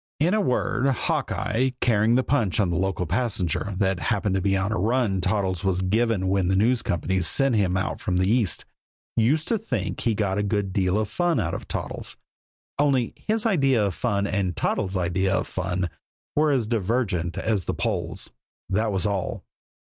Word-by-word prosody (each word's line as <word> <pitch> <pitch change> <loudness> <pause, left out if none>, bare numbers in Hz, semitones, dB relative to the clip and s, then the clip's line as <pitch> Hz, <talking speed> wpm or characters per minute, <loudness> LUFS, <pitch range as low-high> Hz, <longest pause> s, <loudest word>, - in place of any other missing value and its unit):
In 165 +6 +3
a 215 - +3
word, 125 - +1
Hawkeye, 130 -1 0
carrying 110 0 +3
the 130 - +3
punch 120 -9 +1
on 95 -4 +2
the - - -1
local 95 0 0
passenger, 100 -2 -1
that 95 -2 +1
happened 100 -2 0
to 95 - +1
be 95 +1 +2
the 95 - +1
run 110 -1 +1
Toddles 95 -2 0
was 95 -1 +1
given 105 0 +1
when 95 -1 +1
the 95 - +2
News 115 +4 +3
Company 95 +2 -1
sent 135 - +2
him 95 -4 +2
out 95 - -2
from 90 -4 0
the 95 +1 +2
East, 110 -3 +2 0.5
used 140 +8 +2
to 230 - +1
think 125 - -3
he 115 -2 +1
got 100 -1 0
a - - +2
good 100 -2 -1
deal 95 0 +1
of 110 -1 0
fun 175 - 0
out 85 - -1
of - - -5
Toddles - - -4 0.6
only 135 -5 +2
his 220 +1 -2
idea 135 - +3
of 100 - -1
fun 100 0 0
and 100 -3 -1
Toddles' 95 +4 -1
idea 95 +2 +1
of - - 0
fun 95 -1 -2 0.5
were 150 +1 +3
as 130 -6 +2
divergent 105 -5 -1
as 105 -6 0
the - - -2
poles, - - -3 0.4
that 110 +3 0
was 95 -1 0
all. 100 -3 -2
100 Hz, 185 wpm, -25 LUFS, 95-120 Hz, 0.6 s, In